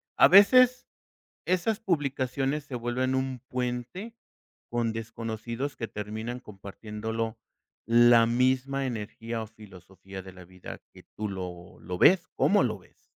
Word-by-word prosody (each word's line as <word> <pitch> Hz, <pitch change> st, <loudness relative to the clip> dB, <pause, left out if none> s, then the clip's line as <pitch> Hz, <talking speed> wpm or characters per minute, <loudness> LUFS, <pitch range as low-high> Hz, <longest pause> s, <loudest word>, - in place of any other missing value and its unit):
A -, -, +7 dB
veces 250 Hz, +6 st, +6 dB, 0.6 s
esas 185 Hz, +4 st, +1 dB
publicaciones 140 Hz, -, -1 dB
se 125 Hz, -, -7 dB
vuelven 125 Hz, +2 st, -1 dB
un 130 Hz, -1 st, -2 dB
puente 125 Hz, -, -4 dB, 0.6 s
con 115 Hz, -1 st, 0 dB
desconocidos 115 Hz, +4 st, -5 dB
que 115 Hz, -, -5 dB
terminan 110 Hz, +4 st, -5 dB
compartiéndolo 110 Hz, +1 st, -6 dB, 0.5 s
la 115 Hz, 0 st, +6 dB
misma 130 Hz, +3 st, +1 dB
energía 115 Hz, 0 st, -5 dB
o 110 Hz, -, -8 dB
filosofía 95 Hz, -2 st, -12 dB
de 95 Hz, 0 st, -11 dB
la 90 Hz, -1 st, -13 dB
vida 90 Hz, +1 st, -10 dB
que -, -, -14 dB
tú 105 Hz, 0 st, -3 dB
lo 90 Hz, -2 st, -8 dB
lo 90 Hz, -1 st, -6 dB
ves, 180 Hz, -, +5 dB
¿cómo 205 Hz, -7 st, +4 dB
lo 110 Hz, -4 st, -1 dB
ves? 90 Hz, -, -25 dB
120 Hz, 130 wpm, -27 LUFS, 105-135 Hz, 0.6 s, A